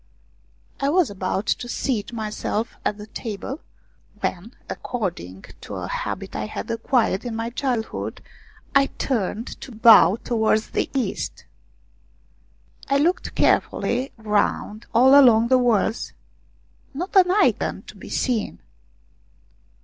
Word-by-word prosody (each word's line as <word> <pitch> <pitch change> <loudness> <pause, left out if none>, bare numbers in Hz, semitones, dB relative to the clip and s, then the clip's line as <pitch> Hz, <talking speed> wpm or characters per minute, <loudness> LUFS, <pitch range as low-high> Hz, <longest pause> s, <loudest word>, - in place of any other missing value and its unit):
I 275 - +1
was 340 - +2
about 190 +1 -2
to 240 - -1
seat 240 -4 -2
myself 220 0 -3
at 210 - -1
the 210 - -8
table, 220 +6 -6 0.6
when, 195 +7 -4
according 130 - -5 0.2
to - - -7
a - - -4
habit - - -4
I 105 - -3
had 230 - -5
acquired 230 -3 +1
in 240 -2 -4
my 230 +1 -3
childhood, 245 -3 -3 0.5
I 275 0 +5
turned 230 -4 -2 0.2
to 265 - -9
bow 220 -3 +7
towards 220 -2 0
the - - -1
east. 245 -8 -3 1.4
I 275 - +3
looked 335 +6 0
carefully 250 +3 +1
round 210 0 -1
all 255 +3 +6
along 235 -5 +7
the 260 -1 +5
walls 230 -2 +1 0.8
not 360 +8 -5
an 370 -2 +6
Icon 400 +3 +1
to - - -13
be - - -11
seen. 240 -5 -1
230 Hz, 125 wpm, -23 LUFS, 210-260 Hz, 1.4 s, bow